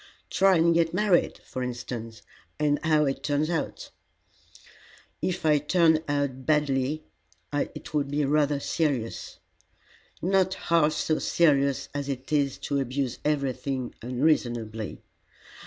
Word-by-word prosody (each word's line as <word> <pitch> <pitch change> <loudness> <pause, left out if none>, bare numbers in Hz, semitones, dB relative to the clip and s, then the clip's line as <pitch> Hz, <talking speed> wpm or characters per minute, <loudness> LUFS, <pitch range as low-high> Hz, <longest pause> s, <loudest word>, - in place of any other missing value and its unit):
"Try 190 -1 +4
and 170 +1 +4
get 165 0 +2
married, 195 -3 +2
for 130 - -5
instance, 120 -2 -5 0.4
and 145 -1 +2
see 160 - -2
how 155 -1 +4
it 135 -1 -2
turns 150 +2 0
out." 165 - -3 1.3
"If 180 -3 -2
it 150 -1 +2
turned 160 -3 +4
out 140 -3 -1
badly 150 -1 +1 0.5
it 145 +1 -3
would 145 -2 0
be 145 +1 0
rather 145 0 +2
serious." 140 -7 -2 0.8
"Not 190 +1 +2
half 160 -2 +2
so 155 0 0
serious 140 -5 +2
as 145 0 -3
it 135 +1 -5
is 140 -2 +1
to 140 - 0
abuse 130 -1 -2
everything 135 -3 -1
unreasonably. 120 -5 -1
145 Hz, 125 wpm, -27 LUFS, 130-160 Hz, 1.3 s, Try